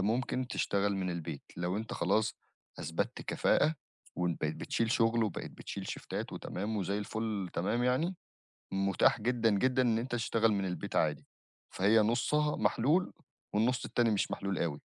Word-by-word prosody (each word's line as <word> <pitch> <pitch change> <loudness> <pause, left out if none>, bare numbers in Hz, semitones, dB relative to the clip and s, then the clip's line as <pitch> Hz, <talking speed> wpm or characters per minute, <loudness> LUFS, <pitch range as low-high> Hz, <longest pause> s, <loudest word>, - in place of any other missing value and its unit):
ممكن 125 +5 0
تشتغل 100 -4 0
من 95 -1 -1
البيت 85 -4 -5
لو 90 +2 -1
أنت 110 +1 -4
خلاص 105 +5 +1 0.4
أثبتت 80 +2 -2
كفاءة 160 - +2 0.4
وإن 90 -1 +1
بقيت 80 0 -1
بتشيل 115 -1 -1
شُغل، 115 0 +3
وبقيت 100 - -4
بتشيل - - -7
شيفتات - - -5
وتمام 105 +4 -3
وزي 100 0 -1
الفل 105 -2 -3
تمام 115 +8 0
يعني، 155 +9 +1 0.6
متاح 95 +2 +3
جدًا، 115 0 +2
جدًا 130 +5 +3
إن 115 -3 +3
أنت 120 +3 -3
تشتغل 115 -1 +2
من 100 -2 0
البيت 90 -3 -4
عادي، 75 -1 +1 0.5
فهي 105 +4 +4
نُصّها 150 +7 +2
محلول، 175 +6 +2 0.4
والنُص 120 +4 +2
التاني 120 -1 +2
مش 100 - 0
محلول 100 -1 -2
أوي. 75 -4 -1
110 Hz, 150 wpm, -32 LUFS, 95-120 Hz, 0.6 s, فهي